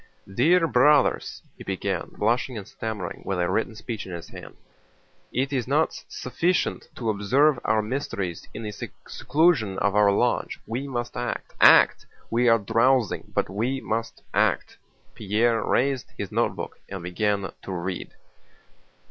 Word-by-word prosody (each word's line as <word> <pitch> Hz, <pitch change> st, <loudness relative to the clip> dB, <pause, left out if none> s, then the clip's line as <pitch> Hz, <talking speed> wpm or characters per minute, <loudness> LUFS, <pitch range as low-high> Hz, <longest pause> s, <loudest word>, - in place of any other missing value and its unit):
"Dear 170 Hz, -, +4 dB
Brothers," 145 Hz, 0 st, +3 dB, 0.2 s
he -, -, -8 dB
began, -, -, -3 dB
blushing 120 Hz, +3 st, 0 dB
and 100 Hz, -, -7 dB
stammering, 105 Hz, -6 st, -5 dB
with 95 Hz, -, -2 dB
a 90 Hz, -, +1 dB
written 110 Hz, +3 st, -1 dB
speech 110 Hz, -1 st, -6 dB
in -, -, -8 dB
his 85 Hz, -1 st, -7 dB
hand, -, -, -11 dB, 0.7 s
"it 135 Hz, +2 st, -1 dB
is 125 Hz, -3 st, -1 dB
not 150 Hz, +4 st, +1 dB
sufficient 165 Hz, +9 st, -1 dB
to 115 Hz, -3 st, -1 dB
observe 130 Hz, +8 st, +3 dB
our 110 Hz, -1 st, +2 dB
mysteries 105 Hz, -, -4 dB
in 115 Hz, -, -7 dB
the 105 Hz, -, -4 dB
seclusion 120 Hz, -, 0 dB
of 100 Hz, 0 st, +1 dB
our 105 Hz, -1 st, +5 dB
lodge—we 120 Hz, +3 st, -1 dB
must 120 Hz, -3 st, -4 dB
act—act! -, -, +4 dB, 0.2 s
We 120 Hz, +1 st, +3 dB
are 115 Hz, -, +6 dB
drowsing, 115 Hz, +2 st, +1 dB
but -, -, +1 dB
we 120 Hz, +7 st, -1 dB
must 115 Hz, -1 st, -4 dB
act." -, -, +1 dB, 0.4 s
Pierre 110 Hz, +2 st, +1 dB
raised 135 Hz, 0 st, 0 dB
his -, -, -5 dB
notebook -, -, -2 dB
and 95 Hz, -3 st, -6 dB
began 100 Hz, +2 st, -1 dB
to -, -, -7 dB
read. 90 Hz, 0 st, -4 dB
115 Hz, 140 wpm, -25 LUFS, 100-130 Hz, 0.7 s, are